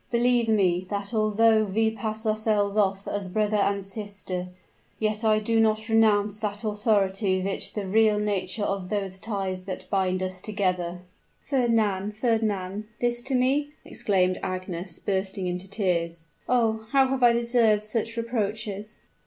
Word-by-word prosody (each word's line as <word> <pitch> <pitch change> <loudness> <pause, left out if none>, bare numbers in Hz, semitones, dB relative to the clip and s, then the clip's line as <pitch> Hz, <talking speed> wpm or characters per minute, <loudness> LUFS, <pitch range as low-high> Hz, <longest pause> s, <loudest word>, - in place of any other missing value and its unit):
Believe 240 -1 +2
me, 185 -4 +2
that 200 +2 -4
although 220 0 +4
we 220 +2 +1
pass 220 0 -4
ourselves 215 -2 +1
off 195 -2 +1
as 200 -2 -3
brother 210 +2 +1
and 200 -1 +1
sister, 195 -2 -6 0.5
yet 215 0 -1
I 215 -1 +4
do 225 +1 +1
not 220 0 +2
renounce 210 -2 +3
that 210 0 -3
authority 205 -3 +1
which 195 +1 -3
the 205 -2 -3
real 215 +2 +3
nature 205 -1 -1
of 195 -2 -2
those 195 -2 -3
ties 190 -3 -3
that 185 -1 -6
bind 185 -2 +1
us 185 0 -5
together 180 -4 -1 0.2
" - - -41
"Fernand! 215 -6 +1
Fernand! 215 -3 -1
this 240 0 0
to 265 +2 -2
me!" 280 +4 +1
exclaimed 185 -2 +1
Agnes, 185 -2 -4
bursting 190 -1 -2
into 180 +1 -3
tears. 170 -5 -1 0.3
"Oh! 220 -3 +1
how 270 -1 +6
have 265 -1 -1
I 240 -1 +6
deserved 235 -3 +3
such 225 +1 -2
reproaches?" 215 -2 -3
210 Hz, 150 wpm, -26 LUFS, 190-225 Hz, 0.5 s, how